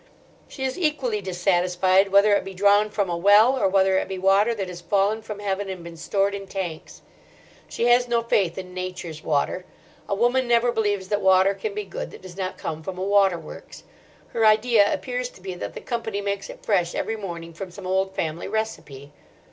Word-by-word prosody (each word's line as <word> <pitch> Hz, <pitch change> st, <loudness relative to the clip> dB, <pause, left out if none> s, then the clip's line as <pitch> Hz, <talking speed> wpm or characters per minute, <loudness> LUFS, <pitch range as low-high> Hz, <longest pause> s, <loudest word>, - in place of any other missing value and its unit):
She 265 Hz, -, -7 dB
is 260 Hz, +5 st, -2 dB
equally 270 Hz, -, 0 dB
dissatisfied 185 Hz, +1 st, +2 dB
whether 200 Hz, +1 st, +5 dB
it -, -, 0 dB
be 190 Hz, 0 st, -8 dB
drawn 205 Hz, +2 st, +4 dB
from 205 Hz, -2 st, -1 dB
a 175 Hz, -, -2 dB
well, 205 Hz, +8 st, +5 dB
or 255 Hz, -, +1 dB
whether 190 Hz, 0 st, +3 dB
it -, -, -4 dB
be 190 Hz, -, -5 dB
water 195 Hz, +5 st, +3 dB
that 195 Hz, -3 st, -3 dB
has 180 Hz, -1 st, -8 dB
fallen 200 Hz, +4 st, +1 dB
from 215 Hz, -1 st, -7 dB
heaven 200 Hz, -1 st, -3 dB
and 185 Hz, -2 st, -6 dB
been 170 Hz, 0 st, -9 dB
stored 195 Hz, +4 st, 0 dB
in 195 Hz, -1 st, -6 dB
tanks. 180 Hz, -5 st, -6 dB, 0.7 s
She 235 Hz, -, -2 dB
has 245 Hz, +1 st, +4 dB
no 235 Hz, -1 st, +1 dB
faith 195 Hz, -7 st, +1 dB
in 185 Hz, -1 st, -7 dB
Nature's 180 Hz, -4 st, -6 dB
water. 150 Hz, +4 st, 0 dB, 0.5 s
A 200 Hz, -, +1 dB
woman 245 Hz, +4 st, +2 dB
never 240 Hz, 0 st, +3 dB
believes 205 Hz, -4 st, -1 dB
that 205 Hz, -1 st, 0 dB
water 190 Hz, +1 st, +4 dB
can 415 Hz, -, -5 dB
be 420 Hz, -, -2 dB
good -, -, -6 dB
that -, -, -13 dB
does 185 Hz, -2 st, -10 dB
not 185 Hz, -1 st, -4 dB
come 160 Hz, 0 st, -5 dB
from 180 Hz, +3 st, -6 dB
a 185 Hz, -, -3 dB
water 195 Hz, -2 st, +3 dB
works. -, -, -11 dB, 0.5 s
Her 230 Hz, -, -1 dB
idea 215 Hz, -1 st, +4 dB
appears 250 Hz, -1 st, -3 dB
to -, -, -18 dB
be 185 Hz, 0 st, -6 dB
that 180 Hz, -, -7 dB
the -, -, -7 dB
Company 230 Hz, -4 st, -3 dB
makes 200 Hz, -1 st, -3 dB
it -, -, -11 dB
fresh 180 Hz, -5 st, +1 dB
every 225 Hz, -, -2 dB
morning 170 Hz, -5 st, -7 dB
from 185 Hz, +3 st, -7 dB
some 185 Hz, +2 st, -11 dB
old 190 Hz, +1 st, 0 dB
family 160 Hz, +1 st, -3 dB
recipe. 150 Hz, -10 st, -4 dB
195 Hz, 210 wpm, -24 LUFS, 185-220 Hz, 0.7 s, whether